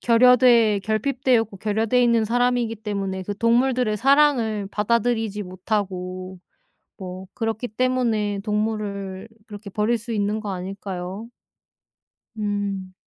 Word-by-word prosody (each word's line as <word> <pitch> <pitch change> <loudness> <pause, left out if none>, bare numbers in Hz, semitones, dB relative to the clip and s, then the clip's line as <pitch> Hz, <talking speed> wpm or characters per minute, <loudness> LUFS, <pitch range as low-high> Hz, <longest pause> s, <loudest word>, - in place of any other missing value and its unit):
결여돼 235 -3 +5
결핍되어 240 +3 +1
있고 205 -3 -10
결여되어 220 +4 +1
있는 235 -2 +3
사람이기 245 0 +1
때문에 200 -3 -3
그 200 +2 -5
동물들의 235 -1 +2
사랑을 255 -5 +3
받아들이지 225 -1 0
못하고 185 -1 -4 0.6
뭐 185 -1 -8
그렇기 225 +1 -2
때문에 220 -4 0
동물을 210 -2 -3 0.2
그렇게 205 -1 -9
버릴 210 +4 +1
수 230 +1 -7
있는 210 0 0
거 210 -2 -5
아닐까요? 190 +2 -6 1.1
음. 200 -3 -3
215 Hz, 285 characters per minute, -23 LUFS, 200-235 Hz, 1.1 s, 결여돼